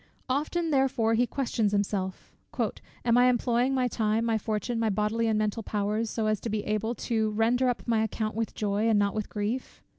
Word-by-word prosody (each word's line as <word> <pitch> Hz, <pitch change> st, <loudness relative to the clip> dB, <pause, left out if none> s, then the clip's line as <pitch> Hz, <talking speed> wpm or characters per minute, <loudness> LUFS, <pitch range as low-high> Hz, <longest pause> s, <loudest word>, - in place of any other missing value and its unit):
Often 310 Hz, +5 st, 0 dB
therefore 265 Hz, -5 st, +2 dB
he 240 Hz, +2 st, +3 dB
questions 230 Hz, -6 st, -1 dB
himself, 195 Hz, -2 st, -2 dB, 0.7 s
"Am 240 Hz, 0 st, +4 dB
I 250 Hz, 0 st, +6 dB
employing 245 Hz, +2 st, +1 dB
my 255 Hz, -1 st, +2 dB
time, 220 Hz, -1 st, 0 dB
my 225 Hz, -1 st, +1 dB
fortune, 220 Hz, +2 st, -2 dB
my 225 Hz, -1 st, +1 dB
bodily 215 Hz, +3 st, 0 dB
and 220 Hz, -1 st, +2 dB
mental 215 Hz, +1 st, 0 dB
powers, 210 Hz, +2 st, -1 dB
so 220 Hz, 0 st, -2 dB
as 215 Hz, -1 st, +1 dB
to 230 Hz, -, -4 dB
be 210 Hz, -1 st, -1 dB
able 215 Hz, +3 st, -1 dB
to 220 Hz, -2 st, 0 dB
'render 235 Hz, +4 st, +2 dB
up 245 Hz, -, -3 dB
my 225 Hz, -2 st, +2 dB
account 215 Hz, 0 st, -2 dB
with 225 Hz, 0 st, -2 dB
joy, 210 Hz, +1 st, 0 dB
and 220 Hz, -, +4 dB
not 200 Hz, -1 st, +2 dB
with 215 Hz, -1 st, -3 dB
grief?' 215 Hz, +5 st, -4 dB
225 Hz, 200 wpm, -28 LUFS, 210-240 Hz, 0.7 s, I